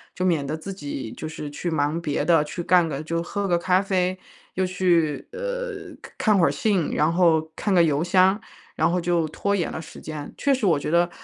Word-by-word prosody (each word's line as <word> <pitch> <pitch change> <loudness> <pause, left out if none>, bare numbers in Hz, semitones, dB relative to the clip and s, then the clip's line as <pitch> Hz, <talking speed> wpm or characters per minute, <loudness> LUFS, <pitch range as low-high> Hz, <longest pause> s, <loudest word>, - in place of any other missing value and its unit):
就 185 - -1
免 165 -6 +1
得 150 +3 -3
自 195 +5 -7
己 145 - -6
就 155 - -6
是 155 -1 -6
去 175 +4 -4
忙 155 +1 0
别 150 -3 -1
的， 165 -3 +4
去 175 +3 -5
干 175 -2 +4
个 150 0 -4
就 165 +1 -2
喝 200 +3 -3
个 175 - +2
咖 180 +1 +3
啡， 185 -1 0 0.4
又 185 - +1
去， 175 -5 +1
呃， - - -5
看 215 - 0
看 200 - +3
会 170 - +5
儿 - - +1
信， 180 +3 0
然 155 +2 +2
后 160 -3 +3
看 205 - -1
个 175 - +6
邮 150 -2 +1
箱， 185 +3 +4 0.4
然 - - +2
后 180 +1 0
就 170 -2 +1
拖 200 +6 -1
延 180 -5 0
了 160 - -5
时 160 - -11
间。 150 -2 -7
确 280 - +2
实 255 -5 0
我 165 -6 +3
觉 145 - -4
得， 170 +2 +3
175 Hz, 245 characters per minute, -24 LUFS, 155-185 Hz, 0.4 s, 个